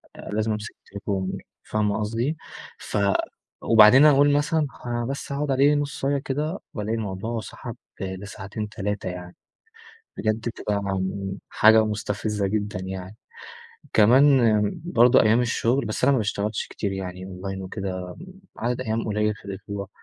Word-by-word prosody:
آآ - - -9
لازم 110 +1 0
أمسك 105 0 -5
التليفون، 100 -2 -4 0.3
فاهمة 105 -1 0
قصدي؟ 115 +8 -1 0.4
ف - - -4 0.6
وبعدين 115 +5 +7
أقول 145 -1 +6
مثلًا 145 +1 +1
خ - - -13
أنا 120 0 -1
بس 140 +3 -5
هاقعد 140 0 -1
عليه 140 +3 +4
نصاية 140 -1 -1
كده، 150 +6 -2
وألاقي 105 +1 -2
الموضوع 110 +2 -3
سحب 120 +2 -8 0.3
لساعتين، 100 +2 -5
3 105 -2 -3
يعني. 90 0 -8 0.8
بجد 110 -1 0
بتبقى، 105 -2 -3
آمم، 95 0 -3
حاجة 110 0 +6
مستفزة 105 -1 -2
جدًا 105 -1 -2
يعني. 95 +2 -6 0.8
كمان 120 -1 +5 0.2
برضه 125 -5 +5
أيام 110 +3 +4
الشغل، 120 +2 +1
بس 110 - -4
أنا - - +6
ما - - +3
باشتغلش 105 -1 -2
كتير 100 -2 -3
يعني 95 -1 -5
أونلاين 95 +1 -6
وكده 95 -1 -5 0.4
عدد 120 +2 -1
أيام 115 -2 -1
قليل 105 0 0
في - - -17
الأسبوع. 100 0 -6
105 Hz, 140 wpm, -24 LUFS, 100-120 Hz, 0.8 s, وبعدين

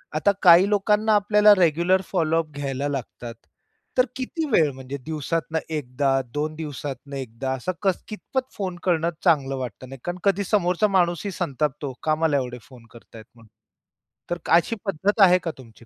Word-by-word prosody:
आता 180 +6 +3
काही, 180 +2 +7
लोकांना 210 +1 +2
आपल्याला 210 +1 +5
रेग्युलर 175 +2 +3
फॉलो 165 -3 +1
अप 155 - -22
घ्यायला 140 -1 -3
लागतात. 125 -4 -6 0.6
तर 255 - +5
किती 270 +5 -3
वेळ? 160 -9 +4
म्हणजे 130 +1 -7
दिवसातनं 160 +1 -2 0.2
एकदा, 135 -1 -1 0.2
2 155 +1 -2
दिवसातनं 145 -2 -6
एकदा, 130 0 -5
असं 130 +8 -3 0.4
कितपत 260 +4 -4
फोन 190 -3 -4
करणं 170 -2 +1
चांगलं 140 -6 +2
वाटत 130 -1 -6
नाही? 135 +1 -10
कारण, 175 +1 -4
कधी 200 0 +2
समोरचा 190 0 +1
माणूसही 175 +2 +1
संतापतो, 145 -3 -3
"का 155 -1 +2
मला 155 -2 +1
एवढे 125 -2 -3
फोन 125 -3 -15
करतायेत 115 -1 -14
म्हणून." 115 -2 -19 0.8
तर, 175 - 0 0.2
अशी 175 +7 0
पद्धत 195 +3 0
आहे 180 -2 +7
का 165 - -2
तुमची 115 -3 -16
160 Hz, 160 wpm, -24 LUFS, 135-190 Hz, 0.8 s, काही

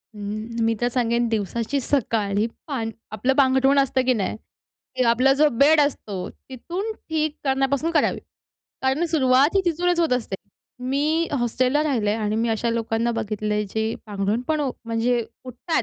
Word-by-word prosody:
अं, 215 +3 -4
मी 225 - +2
तर 240 - +3
सांगेन, 235 -1 +1
दिवसाची 225 +5 -1
सकाळ 225 -7 0
ही, 210 - +3 0.2
पान 235 -7 -3 0.2
आपलं 220 +5 +1
पांघरुण 270 0 +4
असतं, 265 -1 +2
की 255 - +4
नाही, 210 -4 -2 0.6
की 255 - +2
आपला 255 +3 +4
जो 300 +2 +4
बेड 300 +3 +6
असतो, 210 -10 -2
तिथून 350 - -6
ठीक 310 -6 -2
करण्यापासून 270 +3 +1
करावी. 325 - +1 0.6
कारण 265 +5 +1
सुरुवात 280 0 +3
ही - - +5
तिथूनच 350 +1 +1
होत 330 -5 +2
असते. 235 -6 -1 0.4
मी 290 +6 0
हॉस्टेलला 255 +4 +1
राहिले 235 -9 +1
आणि 215 -1 -1
मी 230 +1 +1
अशा 225 +1 0
लोकांना 230 0 0
बघितलंय, 210 0 -1
जे 220 +1 -1
पांघरुण 205 +2 -1
पण 310 -1 +1
उ 280 -3 0
म्हणजे 230 +1 0 0.2
उठतात, 255 +6 -2
255 Hz, 160 wpm, -23 LUFS, 225-285 Hz, 0.6 s, बेड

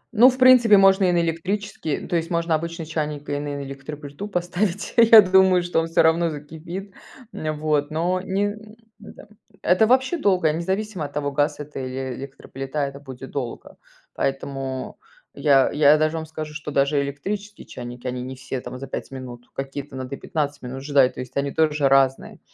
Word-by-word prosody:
Ну, 240 +4 +8
в 255 - -3
принципе, 250 -5 +7
можно 195 0 +5
и 180 - +3
на 175 -1 +2
электрический, 170 0 -3
то - - -2
есть 165 0 -1
можно 170 -1 0
обычный 165 +1 -3
чайник 150 -2 -4
и 145 0 -1
на 145 -1 -4
электроплиту 145 +5 -8
поставить, 180 +1 -2
я 230 -1 +9
думаю, 190 -2 +4
что 175 -1 0
он 165 - -1
всё 165 - +3
равно 165 +1 +3
закипит, 165 +6 -8 0.4
вот. 155 -3 -1
Но 175 +4 0
не 200 +2 -1 0.4
да. 205 - -13 0.4
Это 185 +5 +4
вообще 260 +7 +2
долго, 185 - +2
независимо 190 +1 -2
от 145 - -9
того, 145 -1 -2
газ 145 +2 0
это 150 -1 -7
или 130 0 -4
электроплита, 135 +2 -7
это 140 0 -7
будет 135 -2 -10
долго, 125 -4 -6 0.4
поэтому 135 -1 -3 0.4
я, 135 -3 +3
я 150 0 +5
даже 155 +1 0
вам 160 - -4
скажу, 155 -1 -7
что 150 0 -6
даже 140 +1 +2
электрические 200 +10 -5
чайники 120 0 -9
они 125 0 -3
не 130 +1 -6
все 130 0 -5
там 125 - -8
за 135 - -7
5 135 - -6
минут, 125 -2 -9
какие-то 135 +1 -6
надо 130 +1 -6
и - - -14
15 145 -2 -3
минут 130 +2 -7
ждать, 140 -3 +3
то - - -5
есть 125 +1 -10
они 140 0 0
тоже 150 -2 +2
разные. 135 -1 +2
150 Hz, 180 wpm, -23 LUFS, 135-180 Hz, 0.4 s, я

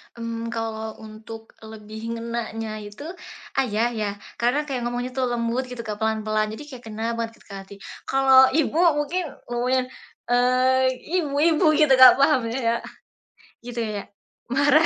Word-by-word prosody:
Mmm, 230 0 -5
kalau 220 -1 -4
untuk 220 +1 -10
lebih 220 +1 -8
ngenanya 225 -2 -4
itu, 205 +5 -11 0.6
ayah 235 -2 +1
ya 220 -3 -2 0.3
karena 245 +5 +2
kayak 265 -4 -3
ngomongnya 245 +1 -3
tuh 260 0 -1
lembut 235 +2 -1
gitu, 250 -2 -7
Kak, 210 -2 -5
pelan-pelan 215 -1 0
jadi 255 - -9
kayak 255 -3 -10
kena 220 0 -6 0.2
banget 230 -1 -2
gitu - - -29
ke - - -7
hati. 195 +1 -12 0.3
Kalau 265 -1 +6
ibu 315 0 +1 0.2
mungkin 325 +5 -1 0.3
ngomongnya, 250 +2 +1 0.5
eee, 255 +1 +3 0.3
ibu-ibu 305 +2 +2
gitu, 305 -2 +4
Kak, 260 - +11
paham, 275 -4 +3
iya. 235 -2 0 0.9
Gitu 240 -1 -4
ya, 210 -3 -4 0.5
marah. 290 +4 +5
235 Hz, 145 wpm, -24 LUFS, 220-260 Hz, 0.9 s, Kak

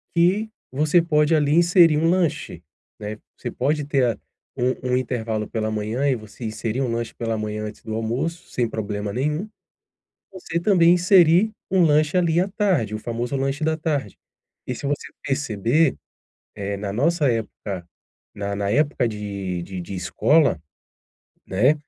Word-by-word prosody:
que 190 +6 +3 0.2
você 150 +6 +3
pode, 150 -1 +2
ali, 145 -1 +2
inserir 170 -1 +5
um 165 +2 +2
lanche, 160 - -1 0.4
né. 105 +1 -5 0.2
Você - - -5
pode 145 +3 0
ter 140 -3 +2
a - - -16 0.4
um 125 0 0
um - - +4
intervalo 115 -4 -2
pela 110 -1 -2
manhã 110 +6 -1
e 135 - +2
você 110 +1 -11
inserir 110 +3 -2
um 125 - 0
lanche 115 0 -3
pela 115 -1 -2
manhã 105 0 -3
antes 105 0 -9
do 110 -1 -5
almoço, 125 +10 -3
sem 120 -2 0
problema 105 -2 -4
nenhum. 150 - -1 0.8
Você 175 -3 -4
também 175 -2 +5
inserir 180 +2 +5 0.2
um 190 -1 +4
lanche, 155 +2 +3
ali, 170 -1 +3
à 185 - +2
tarde, 190 - 0
o 110 - -3
famoso 120 +3 -3
lanche 135 +3 -1
da 160 +1 +2
tarde. 145 - -2 0.5
E 125 - -2
se 140 - -7
você 145 +1 -2 0.2
perceber, 135 +2 +1 0.6
eh, 100 0 -3
na 100 0 -4
nossa 145 - +2
época, 100 -5 -4 0.5
na 100 0 -3
na 100 0 -1
época 145 -1 +2
de 100 -4 -4
de 95 +1 -6
de 90 +3 -7
escola, 145 - +2 0.9
né, 125 +11 +3
130 Hz, 160 wpm, -23 LUFS, 110-160 Hz, 0.9 s, inserir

